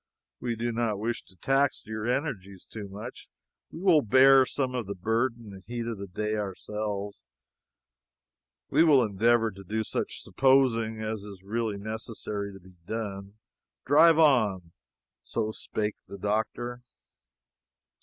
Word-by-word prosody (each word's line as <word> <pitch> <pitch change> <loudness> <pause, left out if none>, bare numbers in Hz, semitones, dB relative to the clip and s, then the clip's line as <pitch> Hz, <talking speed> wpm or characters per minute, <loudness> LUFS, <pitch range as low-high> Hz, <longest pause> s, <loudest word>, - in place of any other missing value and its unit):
We 120 -2 -2
do 120 +1 -2
not 115 -3 0
wish 115 +3 -3
to 95 - -17
tax 135 +8 +1
your 110 0 -4
energies 105 - -3
too 105 -2 -8
much. 105 +6 -9 0.4
We 165 - -8
will 180 -6 +5
bear 135 +2 +6
some 130 -2 -2
of 120 -5 -3
the 100 - -4
burden 115 +2 -1
and 95 -1 -12
heat 120 +1 -4
of 115 -3 -4
the 100 - -6
day 105 +4 -3
ourselves. 105 0 -4 1.5
We - - +5
will 145 -6 +6
endeavor 115 +2 +2
to 100 0 -12
do 110 +4 -2
such - - -4
'supposing' 115 -5 +2
as 110 -1 -3
is 100 -2 -11
really 110 0 -2
necessary 105 -1 -5
to 95 - -12
be 95 0 -18
done. 100 -3 -5 0.5
Drive 160 +4 +6
on." 110 - +3 0.5
So 105 - -2
spake 105 -1 -3
the 100 - -8
doctor. 110 +4 -2
110 Hz, 145 wpm, -28 LUFS, 100-120 Hz, 1.5 s, bear